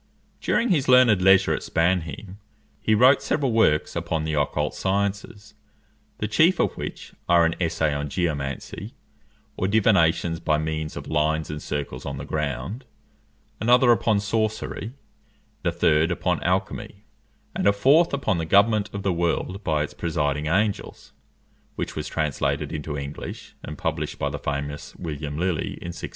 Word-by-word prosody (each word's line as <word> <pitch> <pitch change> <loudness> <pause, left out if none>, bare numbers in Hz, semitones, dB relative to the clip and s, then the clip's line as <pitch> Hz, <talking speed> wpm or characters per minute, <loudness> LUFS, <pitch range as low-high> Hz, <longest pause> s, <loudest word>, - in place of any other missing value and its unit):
During 235 - +1
his 155 -9 +2
learned 125 -6 +6
leisure 95 0 +5
at - - -2
Spannheim, 90 +3 -1 0.4
he 110 - +2
wrote 130 +5 +6
several 135 -4 0
works 110 -9 +2
upon 80 -1 -2
the 80 0 -2
occult 75 -2 0
sciences, 100 +2 -2 0.6
the 105 - -2
chief 165 - +3
of - - +1
which - - -7 0.2
are 85 -1 +5
an 80 - +1
essay 80 -3 +1
on 70 0 -3
geomancy, 80 - -3 0.6
or 95 - 0
divination 95 -6 +3
by 80 -2 +1
means 80 0 -3
of - - -6
lines 80 0 0
and 75 -1 -5
circles 70 -3 -4
on 70 -1 -5
the 70 - -6
ground; 75 - -3 0.8
another 120 +2 +5
upon 110 -2 +2
sorcery; 110 +2 -2 0.7
a - - +1
third 75 +1 +2
upon - - -1
alchymy; 100 - -2 0.5
and - - +1
a - - +7
fourth 140 +12 +4
upon 135 -10 0
the 80 - -2
government 105 +3 +4
of 100 -1 -5
the 95 - +1
world 85 +4 -1
by 75 -4 +1
its 75 - -7
presiding 75 -3 -1
angels, 100 +5 -1 0.6
which - - -4
was - - -4
translated 75 -3 -1
into 75 -1 -4
English, 70 +1 -7
and 75 - -8
published - - -3
by - - -2
the - - -5
famous 70 +1 -4
William 75 -3 -5
Lilly 90 -1 -1
in 85 - -7
1647. 85 - -6
85 Hz, 155 wpm, -24 LUFS, 75-105 Hz, 0.8 s, a